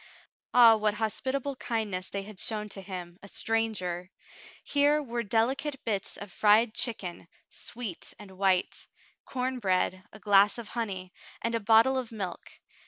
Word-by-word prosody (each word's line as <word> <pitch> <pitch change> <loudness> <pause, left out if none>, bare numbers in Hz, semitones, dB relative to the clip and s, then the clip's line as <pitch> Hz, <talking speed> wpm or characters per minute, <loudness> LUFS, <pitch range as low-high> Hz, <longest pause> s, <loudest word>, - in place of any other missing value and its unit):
Ah, 235 -2 +8
what 210 -1 +1
hospitable 260 +6 -2
kindness 210 -7 -2
they 200 0 -3
had 205 -1 -11
shown 210 -1 -1
to 195 - -6
him, 180 -2 -7
a 200 - -11
stranger! 200 -6 -1 0.5
Here 290 +1 +3
were 240 -2 -3
delicate 260 +6 0
bits 205 -2 -2
of 205 -2 -9
fried 215 +3 +4
chicken, 185 -9 -3 0.2
sweet 230 -8 -6
and 205 -2 -12
white, 190 -1 0 0.4
corn 255 0 -2
bread, 185 -2 0
a - - -12
glass 205 0 +4
of 235 -3 -7
honey, 190 -6 -4 0.3
and 230 - 0
a 230 - +1
bottle 225 +5 +5
of 245 -3 -6
milk. 195 -6 -6
215 Hz, 150 wpm, -29 LUFS, 195-235 Hz, 0.5 s, Ah